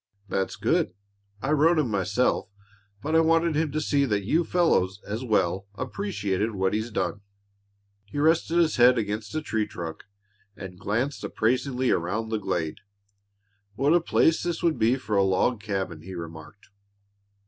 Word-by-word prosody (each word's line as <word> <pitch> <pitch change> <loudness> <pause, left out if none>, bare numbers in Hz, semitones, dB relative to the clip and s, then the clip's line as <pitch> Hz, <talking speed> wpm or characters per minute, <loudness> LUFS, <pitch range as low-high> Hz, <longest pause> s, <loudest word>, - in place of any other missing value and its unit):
"That's 95 0 -1
good. 90 - 0 0.5
I 135 - 0
wrote 160 +3 +4
him, 140 -7 +1
myself, 105 +3 0 0.5
but 155 +2 0
I - - +7
wanted 165 0 +3
him 155 -1 0
to 155 - -1
see 145 -2 +1
that 105 -5 -1
you 160 - +2
fellows, 105 - +1
as 110 +5 -4
well, 100 -4 0
appreciated 110 - -2
what 95 +1 0
he's 110 +2 -1
done." 105 -2 -2 0.8
He 100 - -9
rested 160 +3 +2
his 165 -4 +3
head 125 +1 +6
against 105 +1 -3
a 155 - -1
tree 110 -7 -1
trunk 85 -2 -7 0.5
and 90 -2 -9
glanced 120 +8 -2
appraisingly 125 +2 0
around 105 +7 -1
the 110 -1 -1
glade. 80 -5 -2 1.0
"What 140 +8 +3
a 175 - +4
place 160 -1 +3
this 175 -1 -3
would 165 -2 +1
be 115 +3 +4
for 110 -5 -3
a 100 - +4
log 95 +4 +1
cabin!" 95 -6 -3
he 95 +3 -9
remarked. 80 +1 -10
110 Hz, 160 wpm, -26 LUFS, 95-150 Hz, 1.0 s, I